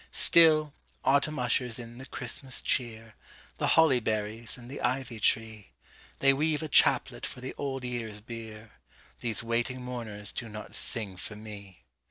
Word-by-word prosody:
Still, 155 -3 +5 0.3
autumn 140 +3 +3
ushers 125 -1 +1
in 120 0 -9
the 135 - -9
Christmas 130 +1 -4
cheer, 115 -3 -1 0.5
The - - +1
holly 155 -6 +6
berries 110 0 -2
and 120 -1 -11
the 135 - -7
ivy 125 -2 -1
tree:They 110 - 0
weave 155 +2 +1
a - - -2
chaplet 145 - +4
for - - -4
the 130 +1 -6
Old 135 -2 -3
Year's 115 -4 -4
bier, 110 -1 -9 0.5
These 115 -2 -1
waiting 120 +2 -1
mourners 110 -5 -4
do 115 - -5
not 105 0 -8
sing 100 -5 -2
for 95 +4 -6
me! 105 -3 -10
120 Hz, 150 wpm, -29 LUFS, 110-130 Hz, 0.5 s, holly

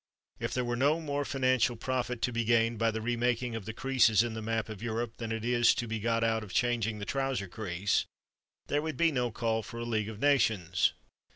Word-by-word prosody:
If - - -3
there 125 -1 0
were 120 0 -1
no 145 +6 +2
more 145 -3 -2
financial 130 -3 +1
profit 125 0 -2
to 125 - +1
be 115 0 0
gained 115 0 +2
by 115 0 +3
the 110 0 -3
remaking 120 0 0
of 110 -4 -5
the 110 - -4
creases 120 -3 +3
in 120 -1 -3
the 110 - -5
map 115 0 -1
of 110 -3 -8
Europe 115 0 -3
than 115 -1 -4
is 120 +1 +3
to 120 - -3
be 110 0 -3
got 115 +1 0
out 110 -1 +1
of 100 - -10
changing 115 -3 +1
the 100 - -5
trouser 135 -6 -1
crease, 95 0 -1 0.6
there 145 - 0
would 155 -3 -4
be 165 -1 +4
no 125 -4 0
call 110 0 -1
for 115 +2 -9
a 120 - -4
League 110 -2 -1
of 110 - -7
Nations. 110 - +2
115 Hz, 220 wpm, -30 LUFS, 110-125 Hz, 0.6 s, be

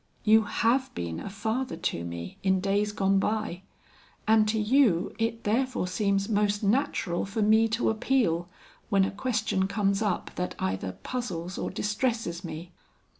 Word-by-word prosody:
You 220 0 +5
have 245 +5 +1
been 85 -2 -4
a - - -6
father 220 +1 -2
to 165 - -2
me 85 0 -7
in 190 -1 +2
days 200 +2 +1
gone 195 -1 +2
by, 215 -3 -1 0.7
and 220 -1 +5
to 220 +1 +1
you 215 -5 +3
it 225 0 -1
therefore 245 -1 0
seems 200 +1 0
most 205 -1 +1
natural 205 -6 +1
for 210 +2 -1
me 220 +2 +5
to 225 +1 +1
appeal 215 -7 +1 0.4
when 195 -3 +4
a - - -2
question 215 -3 0
comes 200 0 0
up 205 -5 -1
that 180 0 -2
either 95 0 -2
puzzles 185 -8 -4
or - - -2
distresses 210 -4 -2
me. 170 +1 -7
205 Hz, 155 wpm, -28 LUFS, 180-225 Hz, 0.7 s, You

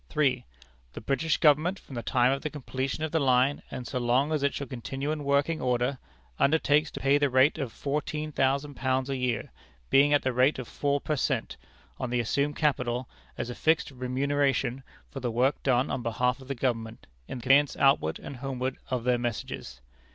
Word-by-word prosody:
"3. 135 -5 +1 0.5
The - - -6
British 140 +7 0
Government, 155 +5 +3
from 140 - -14
the 120 - -3
time 125 +1 +2
of 135 +1 -1
the 155 - -3
completion 135 0 -4
of 155 - -2
the 160 - +2
line, 130 0 +3
and 125 - -6
so 125 +2 -3
long 125 +5 +2
as 155 -2 0
it 140 0 +2
shall 140 - -4
continue 135 +2 -4
in 155 -1 -3
working 140 +3 +1
order, 125 +1 0 0.4
undertakes 150 +1 +3
to - - -8
pay 140 +1 +3
at - - -5
the 145 - +3
rate 130 +5 +4
of 135 -5 -3
fourteen 150 +3 -3
thousand 140 +1 0
pounds 130 0 -1
a - - 0
year, 125 -3 -2 0.4
being 140 +2 +5
at 145 - +3
the 130 - 0
rate 130 +4 +3
of 130 -3 -6
four 145 0 0
per 150 - -2
cent. 135 - -1 0.4
on 130 - -3
the 125 0 0
assumed 140 +5 0
capital, 125 -4 0 0.3
as 120 - -3
a - - -4
fixed 160 +2 +1
remuneration 135 0 0 0.3
for 135 - -6
the 125 -2 -2
work 125 +5 +1
done 130 -1 +1
on - - -2
behalf 125 +3 0
of 130 - -13
the 140 - -3
Government, 115 -3 -2 0.2
in - - -5
the 120 - -9
conveyance 140 +2 +4
outward 135 - +3
and 140 - -9
homeward 130 0 -3
of 125 -2 -1
their 125 0 +2
messages. 105 - -5
135 Hz, 205 wpm, -28 LUFS, 125-145 Hz, 0.5 s, being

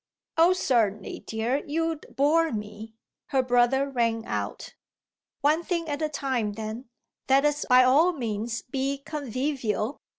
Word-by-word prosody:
"Oh 335 +3 +5
certainly, 225 - 0
dear, 230 +6 -1
you'd 325 +1 -2
bore 320 +4 +3
me," 210 0 -7 0.3
her 265 -1 +1
brother 245 +2 +3
rang 230 -4 0
out. - - -4 0.7
"One 300 +3 +3
thing 340 -2 -2
at 290 0 -3
a 310 - 0
time 260 -7 -2
then. 220 +3 -6 0.4
Let 270 +2 +5
us 295 0 +1
by 255 0 +7
all 290 +8 +5
means 230 -5 -3
be 270 +2 -2
convivial. 265 -4 -2
265 Hz, 135 wpm, -26 LUFS, 225-295 Hz, 0.7 s, by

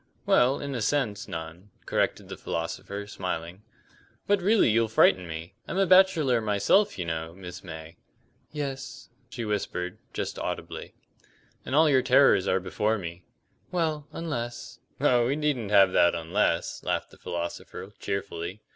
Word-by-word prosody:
"Well, 130 +3 +4
in 140 -1 -4
a 120 - -3
sense, 110 -4 0
none," 80 +4 -7 0.2
corrected - - 0
the - - -6
philosopher, 95 +5 -4
smiling. 90 -2 -5 0.6
"But 205 -1 +2
really 205 - +4
you'll 115 +1 +3
frighten 95 -4 +4
me. 80 +1 -7
I'm - - -3
a 195 - +4
bachelor 170 -10 +5
myself, 110 - +2
you 90 - -3
know, 80 0 -4
Miss 90 -2 -9
May." 80 -2 -9 0.5
"Yes," 140 -3 -5 0.2
she 120 -2 -5
whispered, 95 -4 -3
just - - -4
audibly. - - -5 0.7
"And 130 - -1
all 160 +1 +6
your 135 -3 +4
terrors 125 -9 +5
are 95 - +2
before 100 +4 0
me." 90 -2 -7 0.5
"Well, 155 -4 -1
unless 120 -8 -5
" - - -39
"Oh, 125 -4 +3
we 135 - +1
needn't 145 -8 -1
have 100 -2 +6
that 85 - +4
'unless,'" 85 +1 0
laughed - - -2
the - - -17
philosopher, 85 0 -5
cheerfully. 95 0 -4
105 Hz, 150 wpm, -27 LUFS, 90-140 Hz, 0.7 s, all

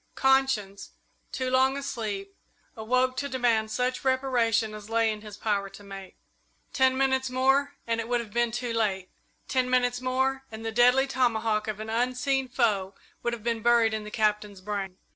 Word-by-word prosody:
Conscience, 265 -7 +1 0.4
too 255 -1 -2
long 265 +1 +3
asleep, 210 -8 -4 0.4
awoke 255 +3 +1
to 280 +1 -2
demand 235 -4 +1
such 250 +3 -1
reparation 240 -5 +1
as 210 0 -9
lay 225 -1 +2
in 210 -1 -6
his 210 -1 -10
power 205 -2 -1
to 195 +1 -13
make. 195 -1 -10 0.6
Ten 260 -1 +3
minutes 265 -1 +1
more 270 +2 +2
and 230 0 -1
it 225 - -7
would 245 0 +2
have 220 -3 -7
been 240 -1 +1
too 240 0 -3
late. 195 -5 -1 0.4
Ten 255 -2 0
minutes 245 -1 +1
more 265 +1 0
and 220 0 -8
the 225 - -2
deadly 250 +3 +5
tomahawk 225 -5 0
of 215 -1 -3
an 220 0 -5
unseen 255 +3 0
foe 205 -6 0 0.3
would 240 - -1
have 230 -3 -6
been 230 -1 -1
buried 235 -1 +4
in 215 -1 -3
the 210 - -8
Captain's 210 -2 0
brain. 195 -1 -4
235 Hz, 180 wpm, -27 LUFS, 215-255 Hz, 0.6 s, deadly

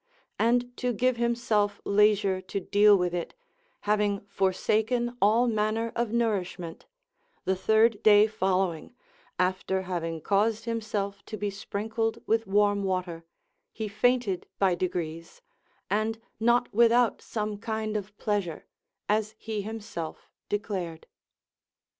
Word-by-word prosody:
And 245 +2 +2
to 250 -1 -1
give 250 +3 +1
himself 230 -4 +1
leisure 200 -2 +3
to 190 +1 -4
deal 205 +2 +5
with 180 -1 -1
it, 175 - -4 0.5
having 205 -1 +1
forsaken 220 +5 0
all 220 +5 +4
manner 220 +1 0
of 235 -2 -1
nourishment, 195 -7 -2 0.6
the 190 - +2
third 220 +2 +3
day 210 -1 +7
following, 190 -3 -1 0.4
after 185 +1 0
having 165 -3 -3
caused 210 +6 +1
himself 210 -3 -3
to 215 - -5
be 205 0 -2
sprinkled 220 +3 -2
with 225 -1 +1
warm 205 0 +2
water, 180 -3 -2 0.5
he 220 -1 -4
fainted 220 -3 +1
by 190 -2 +3
degrees, 170 -2 -4 0.4
and 215 +3 0 0.2
not 240 +2 +2
without 235 +1 +4
some 210 -2 -4
kind 220 0 -3
of 205 0 -5
pleasure, 200 -7 -2 0.4
as 215 0 0
he 220 -2 -4
himself 210 -6 -7 0.2
declared. 190 -6 -3
210 Hz, 120 wpm, -28 LUFS, 190-225 Hz, 0.6 s, day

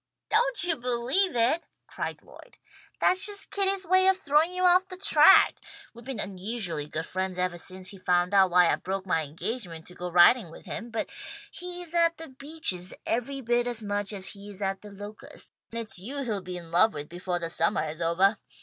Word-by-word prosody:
"Don't 485 +3 +5
you 340 -3 +3
believe 250 +10 +1
it!" 245 +8 +2 0.2
cried - - -6
Lloyd. - - -17 0.4
"That's 370 0 +2
just 410 -1 -1
Kitty's 390 -1 +1
way 375 +2 +4
of 380 0 +4
throwing 310 -1 +2
you 365 0 -1
off 365 +1 +4
the 370 - -8
track. 340 -3 +6 0.4
We've 235 +1 -14
been 260 -3 -6
unusually 190 -6 -3
good 160 +2 -4
friends 185 0 -4
evah 180 -1 -2
since 185 +1 -3
he 195 - -7
found 180 +1 +1
out 190 -2 +5
why 175 -1 +5
I - - +1
broke 190 +1 -5
my 165 -4 +1
engagement 165 - -5
to 180 - -11
go 180 0 -6
riding 175 +4 +5
with 165 - -14
him, 230 +2 -6
but 225 -1 -4 0.4
he 355 0 -6
is 340 -1 -8
at 335 -1 +2
The 325 -2 -9
Beeches 270 - -2
every 270 +4 -2
bit 240 0 0
as 235 -2 0
much 205 0 -1
as 195 -2 -1
he 200 0 -7
is 200 -1 -10
at 195 -1 -2
The 210 - -10
Locusts, 205 +1 -9 0.2
and 230 - -4
it's 215 -5 -4
you 275 +9 -4
he'll 215 -6 -2
be 180 -1 -7
in 170 -2 -11
love 195 +4 +4
with 145 0 -6
befoah 175 +1 -4
the 165 -1 -5
summah 165 -1 0
is 155 +2 -7
ovah. 185 +5 +2
210 Hz, 210 wpm, -27 LUFS, 180-300 Hz, 0.4 s, track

